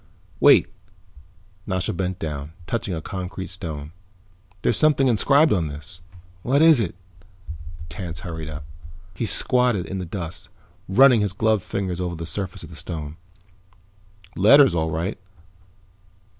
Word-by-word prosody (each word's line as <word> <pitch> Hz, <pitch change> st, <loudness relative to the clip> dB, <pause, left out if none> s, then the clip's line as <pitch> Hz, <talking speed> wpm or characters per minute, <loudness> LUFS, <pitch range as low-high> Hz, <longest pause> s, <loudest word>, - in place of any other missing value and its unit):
"Wait." -, -, +6 dB, 1.0 s
Nasha 95 Hz, +2 st, -1 dB
bent 95 Hz, 0 st, -3 dB
down, 75 Hz, -2 st, -5 dB
touching 100 Hz, -3 st, -3 dB
a 80 Hz, -, -6 dB
concrete 95 Hz, -1 st, -6 dB
stone. 80 Hz, -5 st, -6 dB, 0.7 s
"There's -, -, +2 dB
something 150 Hz, -3 st, +3 dB
inscribed 140 Hz, +5 st, +4 dB
on 85 Hz, -5 st, 0 dB
this." 75 Hz, +5 st, -10 dB, 0.4 s
"What 135 Hz, +7 st, +2 dB
is 160 Hz, -5 st, +6 dB
it?" 90 Hz, -6 st, -3 dB, 0.9 s
Tance 85 Hz, +1 st, -6 dB
hurried 80 Hz, -3 st, -6 dB
up. 75 Hz, -1 st, -8 dB, 0.5 s
He 110 Hz, +6 st, -3 dB
squatted 125 Hz, -5 st, +3 dB
in 95 Hz, -, -5 dB
the 90 Hz, -, -4 dB
dust, 85 Hz, -1 st, -6 dB, 0.4 s
running 125 Hz, +2 st, +6 dB
his 100 Hz, -2 st, -1 dB
gloved 110 Hz, 0 st, +1 dB
fingers 90 Hz, -1 st, -3 dB
over 90 Hz, -1 st, -3 dB
the 85 Hz, 0 st, -6 dB
surface 95 Hz, +2 st, -5 dB
of -, -, -11 dB
the -, -, -10 dB
stone. 75 Hz, -2 st, -6 dB, 1.2 s
"Letters, 135 Hz, +4 st, +6 dB
all 80 Hz, -1 st, 0 dB
right." 85 Hz, +6 st, -3 dB
90 Hz, 135 wpm, -23 LUFS, 80-110 Hz, 1.2 s, Wait